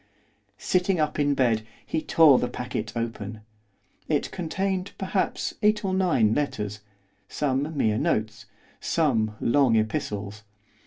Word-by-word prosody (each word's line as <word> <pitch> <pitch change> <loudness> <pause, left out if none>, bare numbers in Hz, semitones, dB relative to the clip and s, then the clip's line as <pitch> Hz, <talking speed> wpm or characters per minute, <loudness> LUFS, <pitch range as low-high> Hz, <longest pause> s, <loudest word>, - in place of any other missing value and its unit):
Sitting 180 -1 +1
up 150 0 0
in 145 -1 +2
bed 115 -5 +2 0.2
he 160 - -2
tore 155 -6 +6
the 125 - 0
packet 110 -4 -4
open. 110 -2 -4 0.7
It 150 -2 0
contained, 190 +2 -2
perhaps, 190 0 -1
eight 210 0 +2
or 190 - 0
nine 160 - +3
letters, 105 -8 -2 0.5
some 145 +2 -1
mere 110 -5 +2
notes, 110 +1 -1 0.3
some 115 -10 +1
long 130 -1 +3
epistles. 105 -1 -2
135 Hz, 120 wpm, -26 LUFS, 110-165 Hz, 0.7 s, tore